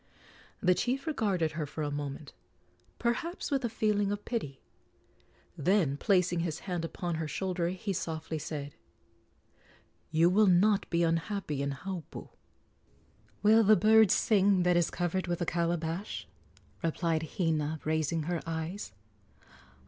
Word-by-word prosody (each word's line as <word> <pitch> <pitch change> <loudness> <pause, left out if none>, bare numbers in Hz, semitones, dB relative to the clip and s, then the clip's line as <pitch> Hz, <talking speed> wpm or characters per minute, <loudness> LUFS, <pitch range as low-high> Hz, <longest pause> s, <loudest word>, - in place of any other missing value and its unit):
The 180 -2 +4
chief 250 - -1
regarded 200 - 0
her 155 -1 -4
for 155 +2 -5
a 145 - -2
moment, 145 0 -5 0.6
perhaps 335 +9 -2
with 275 -2 +1
a 235 - 0
feeling 210 -2 +1
of 205 0 -4
pity; 150 - -4 1.0
then, 165 -3 +2
placing 180 0 +2
his 165 -2 -3
hand 180 -3 -3
upon 170 0 -3
her 160 - -2
shoulder, 180 +2 -2
he 190 +2 -3
softly 160 -2 -4
said: 145 -1 -5 1.4
"You 165 +2 +4
will 205 +4 +4
not 195 +3 +3
be 170 0 +2
unhappy 165 -2 -1
in 140 - -1
Haupu." 180 +3 -7 1.1
"Will 220 +2 +6
the 215 +1 +6
bird 220 0 +6
sing 195 -3 +3
that 180 0 +3
is 175 -1 +3
covered 175 +1 -2
with 175 -1 -1
a 175 - -1
calabash?" 170 +3 -2 0.6
replied 165 -1 -1
Hina, 160 -3 0
raising 155 +1 0
her 170 +1 -2
eyes. 165 - -4
175 Hz, 135 wpm, -30 LUFS, 160-200 Hz, 1.4 s, Will